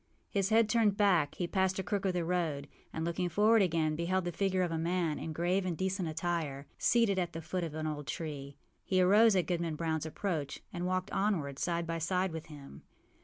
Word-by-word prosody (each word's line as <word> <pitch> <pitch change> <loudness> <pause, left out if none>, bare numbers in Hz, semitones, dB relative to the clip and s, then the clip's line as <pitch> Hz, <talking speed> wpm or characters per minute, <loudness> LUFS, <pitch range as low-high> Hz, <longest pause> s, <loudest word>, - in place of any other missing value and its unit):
â - - -41 0.3
His 195 -1 +1
head 225 +1 +6
being - - -4
turned 220 -3 +3
back, 175 -8 +3
he 180 - -2
passed 190 +1 +1
a 190 - -2
crook 200 +2 -2
of 190 - +1
the 175 -2 -1
road, 165 -5 -1 0.2
and, 160 - -3
looking 175 +1 -1
forward 215 +5 +4
again, 160 -4 +1
beheld 180 +3 0
the 175 - -1
figure 185 +1 +1
of 175 - -1
a 165 - -1
man, 170 -2 0
in 160 - -5
grave 175 +4 0
and 180 -3 -2
decent 190 0 -1
attire, 160 -4 -2
seated 225 -5 +3
at 175 -2 -2
the 165 - -4
foot 180 +3 -2
of 160 -2 -5
an 155 0 -3
old 150 -2 -4
tree. 140 -4 -5 0.3
He 185 - +1
arose 205 +4 +6
at 185 - +2
Goodman 170 -3 -2
Brownâs 160 -1 -1
approach 160 -4 -3
and 175 0 -2
walked 185 0 -1
onward 160 -9 0
side 170 -1 -1
by 165 0 -3
side 180 +3 0
with 160 -1 -6
him. 145 -3 -11
175 Hz, 225 wpm, -32 LUFS, 160-190 Hz, 0.3 s, head